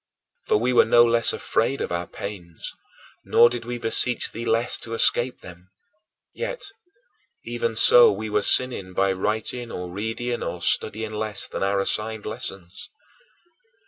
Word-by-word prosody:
For - - +3
we 125 +4 0
were - - +6
no 120 +1 +5
less 115 0 +2
afraid 135 +5 -1
of - - -4
our 85 0 -3
pains, 90 -5 -8 0.5
nor 120 0 +5
did 120 -2 -5
we 120 0 -4
beseech 120 +1 +1
thee 115 +2 -6
less 115 +1 0
to 115 0 -6
escape 120 +2 +1
them. 90 +1 -14 0.6
Yet, - - -5 0.8
even 470 0 -3
so, 480 -1 +8
we - - -5
were 105 -1 0
sinning 100 -5 +1
by 95 +1 +1
writing 110 +5 -3
or 90 -1 -6
reading 115 +5 -4
or 90 -1 -5
studying 110 +4 -1
less 105 -2 -3
than - - -6
our 100 +1 +1
assigned 105 +2 -2
lessons. 100 -5 -6
110 Hz, 150 wpm, -23 LUFS, 100-120 Hz, 0.8 s, so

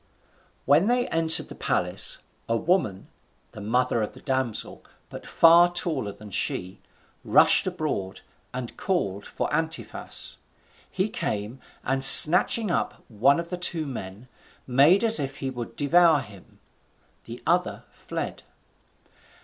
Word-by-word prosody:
When 150 +8 +3
they 245 +1 0
entered 165 0 +1
the - - -9
palace, - - 0 0.3
a 115 - +1
woman, 155 - -1 0.4
the 105 - -11
mother 115 +2 -1
of 105 - -4
the - - -14
damsel, 130 -5 -3 0.3
but - - -11
far 170 +1 +5
taller 155 - -2
than 105 0 -14
she, 90 0 -3 0.4
rushed - - +4
abroad 95 -1 -4 0.3
and 125 -1 -7
called 100 - -3
for - - -4
Antiphas. 160 +1 -3 0.5
He 190 +2 -2
came, 115 - -5 0.2
and 135 +1 -1
snatching 180 +9 +7
up - - -3
one 125 +7 +2
of 170 +1 -7
the 180 - -4
two 170 -3 -2
men, 110 -4 -9 0.4
made 145 - +3
as 225 0 +5
if 140 0 -5
he 135 -1 -5
would 120 -3 -8
devour 160 +1 +3
him. 105 -6 -16 0.7
The - - -11
other - - -1
fled. - - -7
135 Hz, 135 wpm, -24 LUFS, 110-170 Hz, 0.7 s, snatching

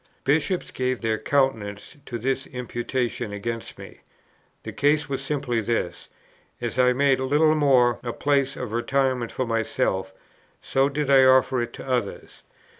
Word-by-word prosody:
Bishops 160 +6 0
gave 130 -1 -1
their 110 -1 0
countenance 115 -4 -1
to 120 - -4
this 135 +3 -2
imputation 125 -2 -3
against 115 +3 -5
me. - - -12 0.6
The - - -7
case 145 +1 +2
was 135 -1 -3
simply 135 -5 -1
this: 105 -5 -3 0.5
as 120 +1 -3
I 125 0 +5
made 135 +1 +2
Littlemore 140 -3 +3
a 120 - -4
place 140 +1 0
of 125 -4 -5
retirement 130 +1 0
for 130 - -2
myself, 110 -4 -1 0.5
so 135 +1 +1
did 145 -1 -1
I 135 -1 +7
offer 130 -1 +4
it 120 0 -4
to - - -9
others. 125 -6 -3
130 Hz, 145 wpm, -24 LUFS, 120-140 Hz, 0.6 s, I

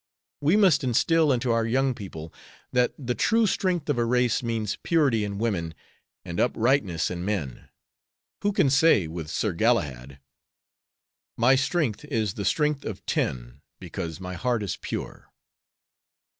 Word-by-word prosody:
We 155 +8 +3
must 195 -8 +4
instill 155 +5 +3
into 125 -1 +1
our 115 0 +2
young 130 +3 +1
people 80 -8 -9 0.4
that 125 -1 +2
the 125 -4 -2
true 225 - +2
strength 185 -5 0
of 145 -5 0
a - - +3
race 125 0 +1
means 115 -4 -2
purity 140 -10 +2
in 100 -1 -4
women 90 -8 -2 0.5
and 85 -1 -5
uprightness 115 - +1
in 90 -1 -4
men; 90 -11 -4 0.7
who 205 - +1
can 145 -8 +2
say, 140 - +4
with 80 -1 -6
Sir 105 +2 -1
Galahad: 75 - 0 1.2
'My 120 +3 +5
strength 135 - 0
is 110 -9 -1
the 100 - -5
strength 150 - +1
of 100 -3 -7
ten, - - -2 0.2
Because 80 0 -6
my 90 -1 -6
heart 120 +4 -1
is 100 - -3
pure.' - - -7
115 Hz, 145 wpm, -26 LUFS, 90-135 Hz, 1.2 s, My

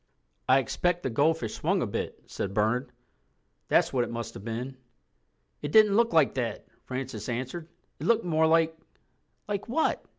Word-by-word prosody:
"I 130 - +7
expect 175 +7 0
the 130 - -1
goldfish 140 -2 +1
swung - - 0
a - - 0
bit," - - -4
said 100 0 -5
Bernard. 120 +4 +1 0.8
"That's - - +3
what 125 -2 +2
it - - -4
must 115 -1 -5
have 95 - -9
been." 120 +4 -5 0.8
"It 145 - -4
didn't 210 0 +6
look 230 +1 +3
like 160 -4 +4
that," 120 -5 -3 0.2
Francis 125 -5 -5
answered. 130 +7 -4 0.3
"It - - -4
looked 230 -2 +3
more 160 -2 +3
like—" 165 0 +3 0.7
"Like 205 -1 -3
what?" 315 +6 +1
135 Hz, 165 wpm, -28 LUFS, 120-165 Hz, 0.8 s, I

